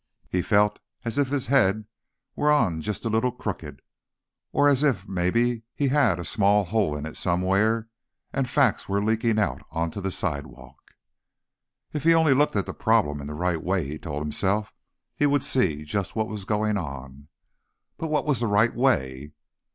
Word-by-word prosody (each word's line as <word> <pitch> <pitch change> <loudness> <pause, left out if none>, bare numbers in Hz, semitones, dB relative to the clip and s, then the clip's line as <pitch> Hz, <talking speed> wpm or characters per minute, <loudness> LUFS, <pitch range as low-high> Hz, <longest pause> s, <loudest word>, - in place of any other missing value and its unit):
He 90 - +1
felt 105 +1 +2 0.3
as 115 +4 -2
if 140 - +2
his 135 -1 -1
head 110 -6 +2 0.5
were 150 - +1
on 90 - +2
just 105 +7 -4
a - - +1
little 115 +3 +1
crooked. 80 - -6 0.7
Or 145 - +3
as 140 -2 +3
if, 125 -10 +1
maybe, 110 +6 0
he 140 -2 +1
had 130 - +3
a 85 - -5
small 105 -1 +3
hole 100 -6 0
in 75 - -6
it 80 - -7
somewhere 100 +6 +1 0.5
and 135 -2 -1
facts 130 -7 +2
were 100 +1 +1
leaking 110 +1 +1
out 105 - 0
onto 85 +4 -3
the 95 - -2
sidewalk. 75 -6 -6 1.0
If 150 -2 -3
he 165 +1 +5
only 160 -4 +4
looked 145 -1 +2
at 100 - +1
the - - -6
problem 100 -11 +1
in 70 - -7
the 75 - -6
right 85 0 -1
way, 95 -2 0
he 75 +2 -6
told 75 -3 -4
himself, 100 +7 -1 0.4
he 145 - +2
would 145 -1 +2
see 80 - +1
just 90 +5 -3
what 110 -1 0
was 105 -3 -6
going 105 0 0
on. 70 -3 -8 0.7
But 165 - -3
what 155 -1 0
was 145 -6 +1
the 120 - 0
right 105 +3 +3
way? 75 - 0
105 Hz, 180 wpm, -25 LUFS, 85-120 Hz, 1.0 s, he